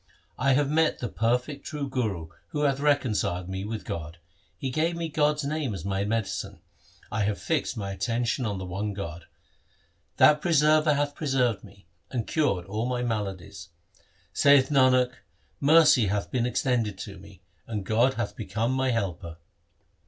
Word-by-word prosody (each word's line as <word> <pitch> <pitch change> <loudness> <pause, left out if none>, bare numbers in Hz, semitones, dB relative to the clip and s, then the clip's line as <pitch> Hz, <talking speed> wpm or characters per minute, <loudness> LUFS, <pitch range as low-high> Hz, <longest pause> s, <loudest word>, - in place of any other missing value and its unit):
I 135 +1 +3
have 145 +1 +2
met 160 +2 +2
the 120 - -3
perfect 125 +5 -1
true 145 -2 -4
Guru 105 -12 -2 0.2
who 150 - -3
hath 140 -2 +2
reconciled 110 -11 +1
me 95 0 -4
with 105 -2 -5
God. 85 0 -6 0.4
He 135 - -3
gave 160 +4 0
me 165 -1 -3
God's 150 0 +1
name 140 -6 -2
as 90 - -7
my 100 0 -1
medicine; 105 -2 -3 0.5
I 110 - -1
have 105 0 -1
fixed 150 -5 -1
mine 100 -2 -4
attention 115 +5 -1
on 100 -2 -2
the 95 - -5
one 100 +4 -3
God. 85 -4 -6 0.9
That 150 0 +6
Preserver 155 -2 +4
hath 145 0 0
preserved 130 -8 0
me, 100 -2 -16 0.2
and 120 -4 -2
cured 120 - 0
all 110 +5 -2
my 125 -1 -1
maladies. 105 -6 -4 0.6
Saith 140 -2 +5
Nanak, 130 -3 +4 0.5
mercy 150 -6 +5
hath 100 +1 -2
been 125 -1 +1
extended 120 -5 0
to 100 -1 -8
me, 100 -1 -15 0.3
and 105 -4 -4
God 120 +6 +2
hath 120 -3 -3
become 110 +2 -2
my 130 0 +1
helper. 90 -7 -3
120 Hz, 160 wpm, -27 LUFS, 100-140 Hz, 0.9 s, That